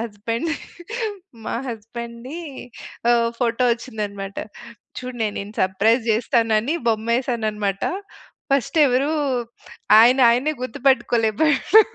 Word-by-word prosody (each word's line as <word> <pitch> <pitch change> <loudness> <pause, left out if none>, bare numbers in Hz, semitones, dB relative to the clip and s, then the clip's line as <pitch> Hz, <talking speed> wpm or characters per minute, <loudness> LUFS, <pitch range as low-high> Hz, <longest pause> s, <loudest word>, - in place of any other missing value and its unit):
Husband 230 +6 -3 0.9
మా - - -3
హస్బాండ్‌ది 235 +5 -7 0.7
ఓహ్! 235 -1 +3
Photo 240 0 +1
వచ్చిందన్నమాట. 210 -4 -5 0.6
చూడు 255 -1 -7
నేను 210 -1 -2
నిన్ను 200 +1 -7
సర్ప్రైజ్ 205 +6 +2
చేస్తానని 225 +3 +1
బొమ్మేసానన్నమాట. 220 -3 -1 0.7
ఫస్ట్ 275 +3 +1
ఎవరు, 265 +4 +1 0.9
ఆయనాయన్నే 250 +4 +5
గుర్తుపట్టుకోలేపోయాడు. 260 - +3
235 Hz, 80 wpm, -22 LUFS, 215-255 Hz, 0.9 s, ఆయనాయన్నే